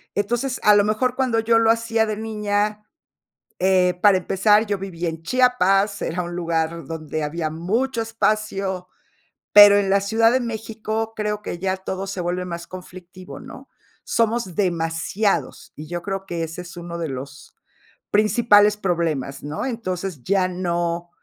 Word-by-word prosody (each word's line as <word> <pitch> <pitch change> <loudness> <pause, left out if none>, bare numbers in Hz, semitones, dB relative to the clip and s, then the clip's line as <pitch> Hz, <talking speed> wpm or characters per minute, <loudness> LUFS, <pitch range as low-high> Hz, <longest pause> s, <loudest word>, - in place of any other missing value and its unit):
Entonces, 240 +6 -1
a 210 -1 +6
lo 205 - +5
mejor 245 +4 0
cuando 250 -4 +1
yo 225 0 +3
lo 225 0 +3
hacía 230 -1 +1
de 215 -1 -3
niña, 210 -1 -2 0.8
eh, 185 -1 +3
para 200 -3 +6
empezar, 210 +4 +3
yo 205 -1 -1
vivía 175 -3 -4
en 165 0 -6
Chiapas, 205 -3 +2
era 180 +2 -2
un 175 0 -6
lugar 165 -1 -2
donde 155 -1 -4
había 155 +1 -2
mucho 225 +9 -1
espacio, 215 -4 -1 0.7
pero 205 -1 +10
en 195 -1 +1
la 200 0 +4
Ciudad 225 +3 +3
de 260 - +2
México 225 -1 -4
creo 210 -1 -2
que 175 - -5
ya 190 0 0
todo 190 +1 -5
se 190 -2 -4
vuelve 180 +1 -2
más 170 -1 -6
conflictivo, 185 0 -11
¿no? - - -12 0.4
Somos 230 -5 0
demasiados, 170 -2 -1
y 155 +1 -9
yo 175 +1 -4
creo 195 0 -4
que 170 -3 -3
ese 165 +2 -6
es 175 0 -11
uno 170 0 -6
de 165 -3 -3
los 135 +2 -8 0.6
principales 210 -1 +4
problemas, 165 -8 -2
¿no? 150 - -4
Entonces, 185 - -4
ya 190 -1 +2
no 175 -1 -2
195 Hz, 160 wpm, -22 LUFS, 170-215 Hz, 0.8 s, pero